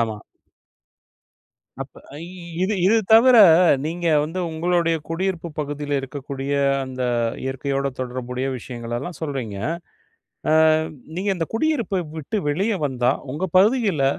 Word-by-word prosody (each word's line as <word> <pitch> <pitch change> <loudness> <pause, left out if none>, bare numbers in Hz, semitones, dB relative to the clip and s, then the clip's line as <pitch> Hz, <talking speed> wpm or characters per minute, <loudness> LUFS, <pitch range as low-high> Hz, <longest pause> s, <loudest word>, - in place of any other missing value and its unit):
ஆமா. 110 -2 -1 1.6
அப்ப - - -7 0.2
அய் 160 +3 -7 0.4
இது 205 +3 +1
இது 220 +4 +5 0.2
தவிர 240 +3 +7 0.5
நீங்க 170 +2 -3 0.2
வந்து 160 +5 -4
உங்களுடைய 165 +1 +1
குடியிருப்பு 175 0 -2
பகுதியில 145 0 -4
இருக்கக்கூடிய 135 +1 -5 0.3
அந்த 130 -1 -5 0.4
இயற்கையோட 135 +1 -2
தொடர்புடைய 125 0 -4
விஷயங்களெல்லாம் 120 +6 -6
சொல்றீங்க. 130 -10 -4 1.2
ஆ 155 - +2 0.4
நீங்க 195 +2 -1
இந்த 165 -2 -2
குடியிருப்ப 235 - 0 0.2
விட்டு 180 +8 -3
வெளியே 195 +8 0
வந்தா, 125 -1 +1 0.2
உங்க 180 +6 -2
பகுதிகள்ல, 200 - +3
155 Hz, 110 wpm, -22 LUFS, 130-185 Hz, 1.6 s, தவிர